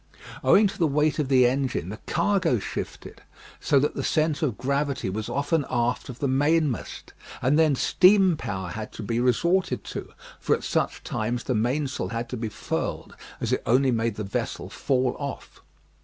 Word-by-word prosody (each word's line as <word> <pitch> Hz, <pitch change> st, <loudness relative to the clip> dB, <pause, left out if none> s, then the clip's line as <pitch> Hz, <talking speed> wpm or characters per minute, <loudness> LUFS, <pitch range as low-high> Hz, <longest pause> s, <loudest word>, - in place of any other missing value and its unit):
Owing 210 Hz, -, +6 dB
to 195 Hz, -, -2 dB
the 165 Hz, -, +3 dB
weight 150 Hz, +2 st, +1 dB
of 145 Hz, -, 0 dB
the 130 Hz, -2 st, +5 dB
engine, 125 Hz, -, 0 dB
the 110 Hz, -, -7 dB
cargo 175 Hz, -6 st, +2 dB
shifted, 100 Hz, -, -6 dB, 0.4 s
so 140 Hz, -, +3 dB
that 145 Hz, -, 0 dB
the -, -, -3 dB
centre 155 Hz, -1 st, +1 dB
of 120 Hz, -, -5 dB
gravity 140 Hz, -5 st, -1 dB
was 110 Hz, +2 st, -4 dB
often 145 Hz, +2 st, 0 dB
aft 120 Hz, +1 st, -1 dB
of 125 Hz, -, -7 dB
the 140 Hz, -, -1 dB
mainmast, 145 Hz, 0 st, 0 dB, 0.3 s
and 135 Hz, +5 st, +2 dB
then 155 Hz, -3 st, +4 dB
steam 185 Hz, +5 st, +5 dB
power 95 Hz, -9 st, -4 dB
had 110 Hz, +3 st, -6 dB
to 110 Hz, -, -7 dB
be 115 Hz, +3 st, -1 dB
resorted 170 Hz, +10 st, +1 dB
to, -, -, -7 dB, 0.3 s
for -, -, +2 dB
at -, -, -8 dB
such -, -, -1 dB
times 120 Hz, +3 st, -2 dB
the 130 Hz, -, -1 dB
mainsail 130 Hz, +1 st, -1 dB
had 115 Hz, +3 st, -4 dB
to 125 Hz, -, -4 dB
be 110 Hz, -1 st, -3 dB
furled 105 Hz, -, -4 dB, 0.2 s
as -, -, -1 dB
it -, -, 0 dB
only 130 Hz, +3 st, +4 dB
made 115 Hz, -2 st, 0 dB
the 105 Hz, -, -4 dB
vessel 100 Hz, -, -4 dB
fall 130 Hz, -2 st, 0 dB
off. 140 Hz, -2 st, -7 dB
130 Hz, 185 wpm, -25 LUFS, 115-150 Hz, 0.4 s, Owing